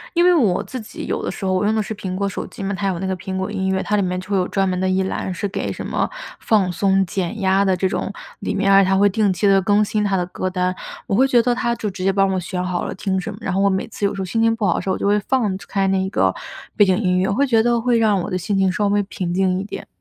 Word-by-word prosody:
因 345 - +4
为 360 - +6
我 225 - +2
自 255 - -7
己 215 - -8
有 - - -3
的 - - -2
时 195 - -6
候 190 - +1
我 185 +2 +1
用 215 - +2
的 220 - +1
是 215 - -5
苹 190 -3 -5
果 200 +1 -1
手 195 - -4
机 - - -9
嘛， 200 +1 -2
它 195 +1 -2
有 180 -3 -1
那 190 - -3
个 190 - -1
苹 190 +1 -5
果 190 +2 -3
音 190 -2 -1
乐， 190 0 0
它 210 - 0
里 205 - +2
面 180 -1 -1
就 185 - -11
会 195 - +2
有 180 - +1
专 195 -1 0
门 180 -1 -1
的 190 0 0
一 190 +1 +1
栏 190 0 -3
是 200 +3 -3
给 195 - -3
什 - - -6
么 - - -1 0.3
放 200 -5 +2
松 195 +2 +2
减 185 +3 -3
压 190 +1 +3
的 190 -1 +2
这 190 +1 0
种， 195 - -3 0.3
里 - - -3
面 195 0 +1
儿 195 0 +7
它 190 0 +2
会 200 +1 +5
定 205 0 +1
期 200 +2 +1
地 195 -1 +5
更 205 +2 +3
新 210 0 -1
它 200 -2 +1
的 180 - 0
歌 185 +1 -3
单， 180 0 -1 0.3
我 195 - 0
会 260 +5 +4
觉 245 -3 +4
得 245 +1 +1
它 235 -1 -1
就 220 -3 -3
直 190 -1 -6
接 195 - +3
帮 195 0 +2
我 190 - 0
选 180 0 -4
好 180 -1 -2
了 - - -4
听 190 0 -1
什 200 +4 -5
么。 205 - -9
然 195 -4 -2
后 195 - +1
我 200 - +4
每 190 +3 -1
次 210 -2 -3
有 200 - 0
时 195 - -4
候 - - -2
心 225 +5 -1
情 225 0 +3
不 225 -2 -2
好 - - +2
的 - - -1
时 - - -4
候， - - +2
我 - - -2
就 - - -2
会 205 +1 +3
放 210 -3 0
开 195 -1 0
那 190 0 +1
个 - - +1 0.4
背 205 - +5
景 185 -1 +2
音 180 -3 +1
乐， 190 - +1
我 195 - 0
会 280 +6 +2
觉 225 -3 +4
得 235 0 +2
会 235 0 +2
让 215 -3 +3
我 - - -4
的 185 - -1
心 195 +3 -2
情 190 -1 +3
稍 205 +2 0
微 205 0 +2
平 185 -3 -4
静 185 0 +1
一 - - -3
点。 205 - -8
195 Hz, 360 characters per minute, -20 LUFS, 185-210 Hz, 0.4 s, 儿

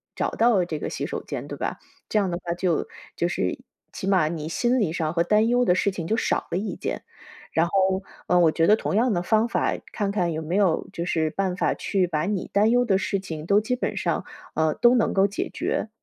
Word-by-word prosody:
找 - - 0
到 225 -5 +3
这 160 -3 -4
个 - - -4
洗 - - -3
手 - - -5
间 - - -6
对 - - -7
吧， - - -3 0.3
这 215 - +2
样 195 - 0
的 175 - -2
话， 170 - -2
就 175 -2 0 0.3
就 170 - 0
是 90 - -1 0.3
起 190 - -5
码 185 -6 +3
你 155 -1 -4
心 240 +9 +1
理 175 -8 0
上 160 -2 -1
和 170 0 +2
担 215 +5 +3
忧 245 +1 +3
的 180 - +4
事 195 - +1
情 175 -4 -5
就 220 - +1
少 - - 0
了 175 - 0
一 205 -2 -4
件， - - -4 0.5
然 160 +2 +2
后， 190 +1 +1 0.2
呃， 180 - +4
我 165 -2 +5
觉 165 +1 +2
得 210 - +7
同 210 - -2
样 240 +2 +3
的 175 -1 -1
方 220 +4 +2
法， - - +1 0.2
看 200 -2 -1
看 180 -4 0
有 160 0 -3
没 170 +4 -2
有 190 -6 +2
就 170 - -3
是 160 -3 0
办 190 -2 -1
法， - - +1
去 190 -3 0
把 155 -2 -1
你 200 -3 -2
担 210 +2 +4
忧 245 +1 +3
的 195 -3 +2
事 195 0 -1
情 160 -5 -7
都 205 +1 +5
基 235 +4 -1
本 250 - -3
上 - - -1 0.3
嗯， 160 -1 +1
都 240 +1 +6
能 235 - +2
够 195 0 +3
解 200 +1 -2
决。 - - -2
190 Hz, 265 characters per minute, -24 LUFS, 170-210 Hz, 0.5 s, 得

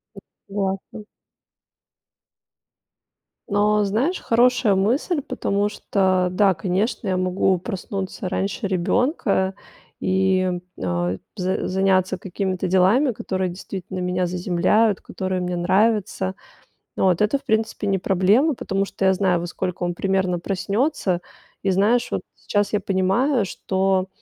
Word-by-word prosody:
М, - - -10 0.3
согласна. 195 +1 -3 2.4
Но 210 +1 +2
знаешь, 245 - 0
хорошая 240 -2 +3
мысль, 255 - +1
потому 205 -5 -1
что 190 -3 +1
да, 190 +1 +3
конечно, 190 +6 -1
я 185 - +1
могу 185 0 +1
проснуться 195 0 -5
раньше 195 +3 -2
ребёнка 195 - +1 0.5
и, 185 -1 +1 0.2
а, 90 0 -1 0.2
за 185 -1 -1
заняться 190 0 +2
какими-то 190 0 -3
делами, 195 +9 +4
которые 190 -3 -2
действительно 185 +1 -7
меня 180 0 0
заземляют, 185 +4 +2
которые 185 -1 -3
мне 180 0 -2
нравятся. 190 +1 +1 0.6
От, 185 0 +2
это, 210 +7 +3
в - - -26
принципе, 220 -4 -1
не 195 -1 +2
проблема, 195 - +3
потому 195 -3 -1
что 195 - -3
я 190 - +5
знаю, 185 -2 +1
во 175 - -4
сколько 180 0 -4
он 175 0 -1
примерно 190 -2 0
проснётся. 195 - -1 0.4
И 195 - +2
знаешь, 225 +6 +2
вот - - -1
сейчас 205 -1 -1
я 210 - +1
понимаю, 200 +6 +1
что 190 0 0
190 Hz, 125 wpm, -22 LUFS, 185-210 Hz, 2.4 s, я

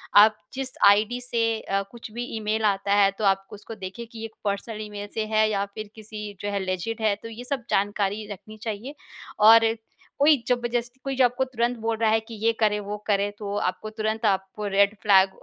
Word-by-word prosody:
आप 215 +1 +8 0.2
जिस 265 0 -3 0.2
आईडी 215 +5 +2
से 230 -2 0
अ, 195 0 -1
कुछ 235 -2 -10
भी 240 +2 -4
ईमेल 220 +1 -1
आता 200 0 +1
है 200 -1 +5
तो 215 - -3
आप 195 0 +2
उसको 210 +2 -9
देखें 195 +3 -7
कि 230 0 -11
ये 225 0 -5 0.2
पर्सनल 210 +2 -2
ईमेल 205 -1 -6
से 220 - -1
है 215 0 +4
या 200 -1 0
फिर 215 -1 -6
किसी 210 -1 -7
जो 205 - -2
है 200 - -1
लेजिड 185 +5 -3
है 210 -2 +2
तो 230 - -6
ये 230 +2 -8
सब 260 0 -3
जानकारी 205 +1 0
रखनी 215 +3 -10
चाहिए 230 +6 -5 0.5
और 225 0 +7 0.4
कोई 290 +1 +6
ज़बरदस्ती, 240 0 -1
कोई 270 -1 -2
जो 260 - +5
आपको 245 +2 +1
तुरंत 245 -1 -1
बोल 225 0 -1
रहा 220 -1 +2
है, 220 - +4
कि 225 +1 -12
ये 230 - +5
करें 210 -1 +2
वो 205 +1 -4
करें 205 -1 +2
तो 200 -1 -4
आपको 185 +2 -2
तुरंत 220 +1 -2
आप 195 -2 +2
रेड 200 0 +2
फ्लैग 195 -2 +6
215 Hz, 210 wpm, -25 LUFS, 205-230 Hz, 0.5 s, आप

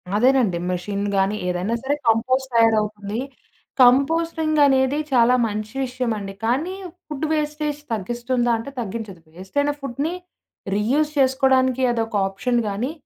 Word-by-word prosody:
అదేనండి. 245 -5 +3
మెషినులు 200 +3 -3
గాని, 195 +2 +2
ఏదైనా 180 +6 -1
సరే 280 +2 0
కంపోస్ట్ 255 +4 +1
తయారవుతుంది. 215 -2 +1 0.6
కంపోస్టింగనేది 290 0 +3
చాలా 245 0 +5
మంచి 215 +2 -5
విషయమండి. 230 -6 -3
కానీ, 285 +11 0 0.3
ఫుడ్ 300 0 -3
వేస్టేజ్ 300 -1 -2
తగ్గిస్తుందా 240 +3 -1
అంటే 225 +4 -7
తగ్గించదు. 215 -5 -6
వేస్టయిన 285 +11 -1
ఫుడ్‌ని 275 +5 -3 0.6
రీయూజ్ 275 +9 +1
చేసుకోడానికి 260 -1 +3
అదొక 225 -2 -2
ఆప్షన్ 215 +6 -1
గానీ, 220 +8 -2
245 Hz, 110 wpm, -22 LUFS, 215-275 Hz, 0.6 s, చాలా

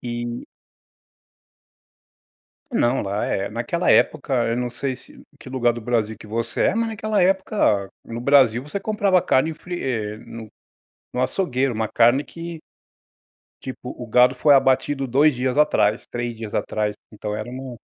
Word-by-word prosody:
E 120 0 -5 2.3
Não, 120 +3 +2
lá, 100 +2 -2
eh, 100 +1 -2
naquela 120 +11 0
época, 140 -3 +2
eu 115 - 0
não 125 0 -1
sei 130 +2 -3
se - - -16 0.2
que - - -13
lugar 120 -2 +1
do 120 - -7
Brasil 110 -2 -1
que - - -13
você 115 +2 -3
é, - - +2
mas 230 0 +1
naquela 215 -1 -1
época 185 - +1
no 115 +1 -6
Brasil 130 -3 +4
você 150 +8 -5
comprava 200 -3 +2
carne 155 +5 +2
fri 175 +2 -7
eh, 110 -5 -2
no 115 -1 -10 0.6
no 125 - -1
açougueiro, 130 -3 0
uma 110 0 -2
carne 120 +5 +4
que 165 0 -8 1.0
tipo, 130 -1 -7
o 120 - -6
gado 125 +3 +4
foi 145 +3 +5
abatido 135 +1 +2
2 140 +4 +4
dias 125 +2 -1
atrás, 110 -7 +2
3 120 -1 -4
dias 110 -2 -8
atrás. 105 -1 -1 0.2
Então 105 0 -5
era 115 - -5
uma 130 -1 -7
125 Hz, 155 wpm, -22 LUFS, 115-145 Hz, 2.3 s, foi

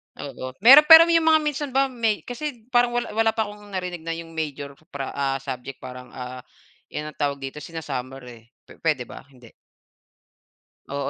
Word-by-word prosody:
Oo. 130 -2 -8
Meron, 280 +5 +9
pero 325 0 +11
'yong 330 -1 +2
mga 315 0 +6
minsan 295 -1 -2
ba 270 0 +2
may 225 -4 -1
kasi 245 -2 -6
parang 240 0 +3
wala 240 - -2
wala 225 0 +1
pa 220 - +1
kong 210 0 -14
narinig 180 -3 -5
na 165 +1 -5
'yong 165 0 -9
major 145 -3 -5 0.2
pra 140 -5 -6
ah, 135 -1 -1
subject 130 0 -6
parang, 125 0 -9
ah, 125 0 -7 0.5
'yan 150 0 -6
ang - - -28
tawag 145 -1 0
dito 135 +2 -6
sina-summer, 135 -5 -6
eh. 120 -2 -13 0.2
Pe - - -18
puwede 150 -6 0
ba? 130 - -13
Hindi. 125 -4 -18 1.4
Oo. 140 -1 -2
160 Hz, 185 wpm, -23 LUFS, -, 1.4 s, pero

